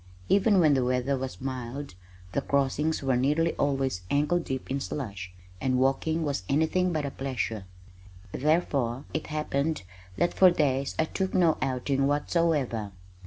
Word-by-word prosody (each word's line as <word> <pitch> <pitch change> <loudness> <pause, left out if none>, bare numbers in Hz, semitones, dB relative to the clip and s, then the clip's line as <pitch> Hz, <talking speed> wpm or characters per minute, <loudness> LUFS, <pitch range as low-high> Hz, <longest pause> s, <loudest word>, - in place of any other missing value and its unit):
Even 200 0 +4
when 155 -4 +5
the 130 -2 +2
weather 125 +2 +1
was 130 0 -5
mild, 130 0 -5 0.4
the 140 - 0
crossings 140 +3 0
were 135 -2 +2
nearly 150 +6 +2
always 135 -8 0
ankle 150 +5 +2
deep 130 -6 -5
in 135 - 0
slush, 100 -10 -5 0.3
and 130 -1 +1
walking 135 +5 +1
was 145 -9 -1
anything 160 +5 +2
but 155 -3 -1
a 140 - -3
pleasure, 120 -7 -3 0.7
therefore 140 - 0
it 155 - -3
happened 155 -1 -1 0.3
that 175 - +1
for 185 - +7
days 140 -5 0
I 160 - +2
took 190 +3 -3
no 170 -4 +4
outing 135 +1 0
whatsoever. 145 - 0
140 Hz, 150 wpm, -28 LUFS, 130-160 Hz, 0.7 s, for